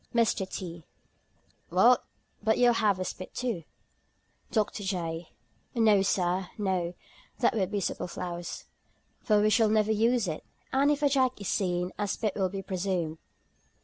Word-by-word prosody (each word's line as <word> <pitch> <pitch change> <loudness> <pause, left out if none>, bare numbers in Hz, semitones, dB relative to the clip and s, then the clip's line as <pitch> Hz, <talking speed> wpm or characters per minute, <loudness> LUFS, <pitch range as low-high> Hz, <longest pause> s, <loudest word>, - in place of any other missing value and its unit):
MR. 220 -5 +2
T. 170 -3 -6 0.9
"Well, 210 +9 +5 0.4
but 220 +1 +2
you'll 245 -1 +5
have 205 -4 +2
a 185 - -2
spit 185 - -7
too." 230 -10 -2 0.8
DR. 215 -3 +2
J. 175 -5 -3 0.5
"No, 215 -4 +5
Sir, 185 -1 +1
no; 185 -4 -1 0.4
that - - +3
would 195 -5 0
be 205 0 -1
superfluous; 175 -1 -4 0.5
for 210 -1 +3
we 215 +1 +3
shall 225 0 +4
never 215 0 +3
use 225 0 +2
it; 155 -2 -4 0.3
and 275 +2 +4
if 295 0 +1
a - - +6
jack 260 -3 +2
is 200 - -4
seen, 180 -2 0
a 205 - 0
spit 210 0 -1
will 190 -2 +1
be 195 +1 -5
presumed." 180 -4 -2
200 Hz, 150 wpm, -29 LUFS, 180-220 Hz, 0.9 s, a